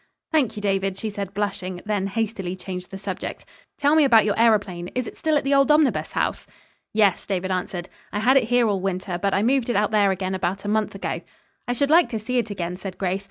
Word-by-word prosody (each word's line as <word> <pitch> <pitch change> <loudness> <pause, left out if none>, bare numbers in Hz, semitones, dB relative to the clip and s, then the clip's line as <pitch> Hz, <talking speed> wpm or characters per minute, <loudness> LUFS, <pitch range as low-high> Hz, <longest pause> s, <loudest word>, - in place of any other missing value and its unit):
"Thank 265 -9 +2
you, 210 - -6
David," 195 -1 0
she 215 +1 -4
said, 200 -2 -5
blushing, 190 -3 -3
then 205 -2 0
hastily 200 -3 -2
changed 180 -1 -7
the 195 - -7
subject. 195 - -6 0.3
"Tell 290 +1 +3
me 315 -1 +6
about 230 -6 +6
your 205 - +2
aëroplane. 205 -6 +1
Is 250 -1 -1
it - - -8
still 315 -2 +1
at - - -1
the 275 +1 +1
old 275 +1 +4
Omnibus 300 -2 +3
House?" - - -1 0.4
"Yes," 205 -4 +3
David 190 -1 -1
answered. 180 -1 -3 0.2
"I - - -3
had 245 +6 +3
it 270 - +5
here 245 0 +3
all 200 -3 0
winter, 185 -1 -2
but 200 0 +1
I 200 - +2
moved 255 0 +2
it 240 - 0
out 210 +1 +2
there 205 -2 +4
again 190 0 -1
about 190 +2 -2
a - - -3
month 215 -1 0
ago." 195 - -3 0.5
"I 245 - +1
should 280 +4 0
like 340 +2 +6
to 225 - -2
see 245 +4 -1
it 225 -2 -2
again," 180 -3 -4
said 190 -1 -7
Grace. 190 0 -1
205 Hz, 240 wpm, -23 LUFS, 190-235 Hz, 0.5 s, me